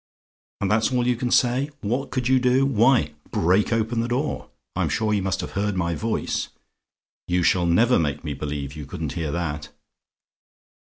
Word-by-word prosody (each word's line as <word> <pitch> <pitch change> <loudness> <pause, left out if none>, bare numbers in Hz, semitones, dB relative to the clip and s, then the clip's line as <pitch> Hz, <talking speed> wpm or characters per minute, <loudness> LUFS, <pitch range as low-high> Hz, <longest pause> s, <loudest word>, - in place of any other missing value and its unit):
"And 95 - 0
that's 110 +4 +2
all 125 -1 +1
you 125 0 +2
can 120 +1 -2
say? 130 +4 +2
"WHAT 125 +5 -2
COULD 125 -2 -1
YOU 130 0 +4
DO? 125 +2 +3
"Why, 120 - +3 0.2
break 95 +6 +2
open 115 +1 0
the 115 - -2
door; 130 +5 -2 0.3
I'm - - 0
sure 110 -1 0
you 100 - +1
must 95 0 -1
have - - -6
heard 100 0 -1
my 85 -1 0
voice: 110 +6 -2 0.8
you 90 0 +1
shall 90 0 +3
never 115 +9 +4
make 75 -3 -1
me 75 -3 -3
believe 70 -1 -5
you 75 -3 -7
couldn't - - -4
hear 80 -3 -3
that. 75 -3 -3
105 Hz, 180 wpm, -24 LUFS, 85-125 Hz, 0.8 s, YOU